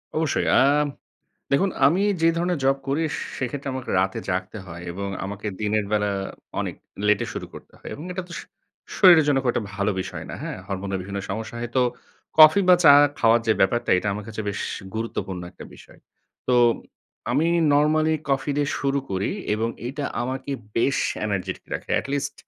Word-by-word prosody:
অবশ্যই 160 Hz, -2 st, 0 dB
আ -, -, +7 dB, 0.9 s
দেখুন 190 Hz, +8 st, +3 dB, 0.2 s
আমি 170 Hz, +7 st, +3 dB, 0.2 s
যে 165 Hz, -, +6 dB
ধরণের 175 Hz, 0 st, 0 dB
জব 135 Hz, +1 st, +4 dB
করি 145 Hz, +4 st, +1 dB, 0.4 s
সেক্ষেত্রে 135 Hz, +2 st, -4 dB
আমাকে 130 Hz, -1 st, -5 dB
রাতে 95 Hz, 0 st, -1 dB
জাগতে 95 Hz, +3 st, -3 dB
হয় 85 Hz, 0 st, -9 dB
এবং 100 Hz, +3 st, -4 dB, 0.2 s
আমাকে 100 Hz, +2 st, -6 dB
দিনের 105 Hz, 0 st, 0 dB
বেলা 105 Hz, -1 st, +2 dB, 0.5 s
অনেক -, -, -3 dB, 0.3 s
লেট 105 Hz, -1 st, +4 dB
এ -, -, -6 dB
শুরু -, -, -5 dB
করতে -, -, -12 dB
হয় -, -, -9 dB
এবং 150 Hz, -, -9 dB
এটা 185 Hz, +1 st, -4 dB
তো -, -, -10 dB
সু -, -, -12 dB, 0.5 s
শরীরের 175 Hz, -5 st, +7 dB
জন্য 140 Hz, -, +3 dB
খুব 125 Hz, -, +2 dB
একটা 110 Hz, -, -2 dB
ভালো 100 Hz, +1 st, 0 dB
বিষয় -, -, -6 dB
না। -, -, -5 dB
হ্যাঁ? -, -, -4 dB
হরমোনের 95 Hz, 0 st, -3 dB
বিভিন্ন 100 Hz, +1 st, -5 dB
সমস্যা 110 Hz, +3 st, -5 dB
হয় 120 Hz, 0 st, -4 dB
তো -, -, +5 dB, 0.6 s
কফি 155 Hz, +5 st, +9 dB
বা 180 Hz, -, +9 dB
চা 145 Hz, -, +10 dB, 0.3 s
খাওয়ার 115 Hz, +1 st, +4 dB
যে 110 Hz, -, +5 dB
ব্যাপারটা 120 Hz, +5 st, +2 dB
এটা 100 Hz, -, -2 dB
আমার 105 Hz, +1 st, -5 dB
কাছে 110 Hz, 0 st, -5 dB
বেশ 100 Hz, 0 st, -3 dB, 0.3 s
গুরুত্বপূর্ণ 100 Hz, -5 st, -4 dB
একটা -, -, -11 dB
বিষয়। -, -, -17 dB, 0.5 s
তো -, -, +3 dB, 0.8 s
আমি 145 Hz, +7 st, +2 dB, 0.3 s
নরমালি 155 Hz, +2 st, +3 dB, 0.2 s
কফি 135 Hz, +2 st, 0 dB
দিয়ে 145 Hz, -1 st, +1 dB
শুরু 140 Hz, 0 st, 0 dB
করি 95 Hz, +1 st, -1 dB, 0.2 s
এবং 110 Hz, +2 st, -1 dB, 0.2 s
এটা 140 Hz, +2 st, -4 dB, 0.2 s
আমাকে 130 Hz, +2 st, -4 dB, 0.3 s
বেশ 135 Hz, +4 st, +2 dB, 0.3 s
এনার্জের্টিক 95 Hz, -3 st, -3 dB
রাখে -, -, -6 dB
এটলিস্ট 140 Hz, 0 st, -3 dB
120 Hz, 180 wpm, -24 LUFS, 100-145 Hz, 0.9 s, চা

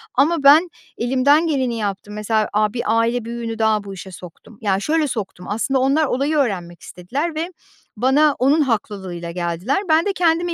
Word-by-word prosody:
Ama 300 Hz, +3 st, +2 dB
ben 305 Hz, +6 st, +7 dB, 0.3 s
elimden 265 Hz, +7 st, +3 dB
geleni 260 Hz, -6 st, -1 dB
yaptım. 205 Hz, -1 st, -4 dB
Mesela, 215 Hz, 0 st, 0 dB
aaa, 210 Hz, +1 st, +1 dB
bir 240 Hz, -, -3 dB
aile 230 Hz, +2 st, +1 dB
büyüğünü 230 Hz, -1 st, -5 dB
daha 220 Hz, -1 st, +2 dB
bu 200 Hz, -1 st, -8 dB
işe 190 Hz, 0 st, -9 dB
soktum. 180 Hz, +5 st, -13 dB
Ya, 195 Hz, -2 st, +1 dB
şöyle 310 Hz, +7 st, 0 dB
soktum. 210 Hz, -7 st, -5 dB
Aslında 260 Hz, +6 st, 0 dB
onlar 275 Hz, +4 st, +2 dB
olayı 285 Hz, +3 st, 0 dB
öğrenmek 180 Hz, -10 st, -2 dB
istediler 280 Hz, -, -4 dB
ve 330 Hz, +3 st, -3 dB, 0.5 s
bana 275 Hz, +5 st, +3 dB
onun 280 Hz, +5 st, +3 dB
haklılığıyla 195 Hz, -8 st, -3 dB
geldiler. 175 Hz, +7 st, -2 dB
Ben 320 Hz, +1 st, +4 dB
de 405 Hz, -, 0 dB
kendimi 345 Hz, -1 st, +1 dB
235 Hz, 170 wpm, -20 LUFS, 205-290 Hz, 0.5 s, ben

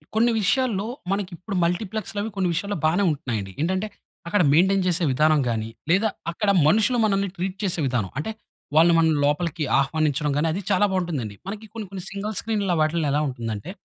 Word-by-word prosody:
కొన్ని 235 Hz, +2 st, +4 dB
విషయాల్లో, 215 Hz, -1 st, +1 dB, 0.3 s
మనకి 195 Hz, -1 st, -1 dB
ఇప్పుడు 195 Hz, +3 st, -6 dB
మల్టీప్లెక్స్‌లవి 205 Hz, +4 st, -2 dB
కొన్ని 185 Hz, -2 st, 0 dB
విషయాల్లో 200 Hz, +4 st, -2 dB
బానే 175 Hz, +6 st, +3 dB
ఉంటున్నాయండి. 115 Hz, -, -3 dB
ఏంటంటే, 190 Hz, +5 st, 0 dB, 0.4 s
అక్కడ 205 Hz, +3 st, +2 dB
మెయిన్‌టేన్ 190 Hz, +4 st, +4 dB
చేసే 175 Hz, 0 st, +1 dB
విధానం 155 Hz, +3 st, +3 dB
గానీ, 110 Hz, -1 st, -2 dB, 0.2 s
లేదా 205 Hz, +5 st, +3 dB, 0.2 s
అక్కడ 200 Hz, +4 st, -1 dB, 0.2 s
మనుషులు 220 Hz, +8 st, +3 dB
మనల్ని 195 Hz, -1 st, +1 dB
ట్రీట్ 185 Hz, +2 st, -3 dB
చేసే 185 Hz, -3 st, 0 dB
విధానం. 120 Hz, -7 st, -1 dB
అంటే, 190 Hz, +9 st, -3 dB, 0.4 s
వాళ్ళు 165 Hz, +2 st, +6 dB
మనల్ని 160 Hz, -2 st, +3 dB
లోపలికి 155 Hz, +2 st, 0 dB, 0.2 s
ఆహ్వానించడం 150 Hz, +1 st, 0 dB
గానీ, 160 Hz, +2 st, +1 dB
అది 195 Hz, -, -3 dB
చాలా 195 Hz, +2 st, +4 dB
బావుంటుందండి. 150 Hz, -, -2 dB
మనకి 215 Hz, +2 st, -6 dB
కొన్ని, 220 Hz, -3 st, -6 dB
కొన్ని 190 Hz, -2 st, -6 dB
సింగిల్ 205 Hz, +1 st, -4 dB
స్క్రీన్‌లో 205 Hz, -5 st, 0 dB
వాటిలో 155 Hz, 0 st, +1 dB
ఎలా 150 Hz, -, +2 dB
ఉంటుందంటే, 115 Hz, -, -5 dB
180 Hz, 170 wpm, -24 LUFS, 155-200 Hz, 0.4 s, వాళ్ళు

